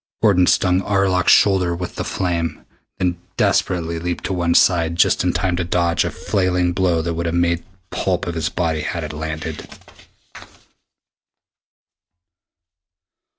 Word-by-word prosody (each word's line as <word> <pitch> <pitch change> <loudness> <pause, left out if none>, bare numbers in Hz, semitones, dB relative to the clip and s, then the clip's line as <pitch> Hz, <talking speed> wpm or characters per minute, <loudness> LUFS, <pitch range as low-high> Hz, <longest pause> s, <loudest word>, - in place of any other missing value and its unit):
Gordon 90 -5 +4
stung 90 0 +3
Arlok's 95 -2 +2
shoulder 95 -4 +4
with 90 +1 -6
the - - -4
flame, 85 -4 -3 0.3
then 90 -1 -1 0.2
desperately 85 -2 0
leaped 85 +1 -4
to 95 - -2
one 85 -2 0
side 85 -2 +3
just 85 - +3
in - - +1
time 90 -2 -1
to 90 - 0
dodge 85 -1 +1
a - - -2
flailing 90 -2 0
blow 85 -3 +1
that 85 0 -2
would 85 +1 -3
have 85 - -2
made 85 -1 +1 0.3
pulp 90 -2 -1
of 85 - -3
his 80 -1 -2
body 80 -3 -1
had 85 +2 -3
it 75 0 -6
landed. 80 +1 -6
85 Hz, 145 wpm, -20 LUFS, 85-90 Hz, 0.3 s, Gordon